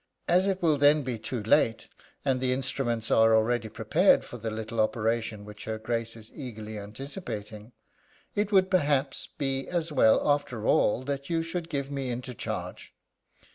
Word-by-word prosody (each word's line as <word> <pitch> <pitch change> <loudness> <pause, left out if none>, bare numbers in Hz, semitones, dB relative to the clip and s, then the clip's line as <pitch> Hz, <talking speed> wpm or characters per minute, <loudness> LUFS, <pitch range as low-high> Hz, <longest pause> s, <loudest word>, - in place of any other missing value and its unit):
As 185 +2 +4
it 190 -2 -1
will 155 -4 +3
then 145 +1 +5
be 125 -3 -3
too 115 0 -4
late, 115 +1 +2 0.4
and 130 -2 +1
the 130 -1 +2
instruments 130 -3 -1
are 110 0 +5
already 110 0 +1
prepared - - +3
for 120 - -9
the 110 +1 -3
little 110 +1 -5
operation 110 -1 -1
which 105 0 -10
her 110 0 -3
Grace 115 +1 -2
is 110 -1 -11
eagerly 110 -6 -7
anticipating, 110 - -7 0.6
it 205 0 -1
would, 190 -2 +4
perhaps, 145 -6 +1
be 135 -1 -3
as 170 -2 -2
well, 110 -4 +4
after 140 -6 0
all, 120 +4 +3
that 140 0 -4
you 165 -1 +1
should 165 0 -4
give 140 -1 -3
me 135 -2 -3
into 125 +1 -4
charge. - - -6
125 Hz, 170 wpm, -28 LUFS, 110-145 Hz, 0.6 s, then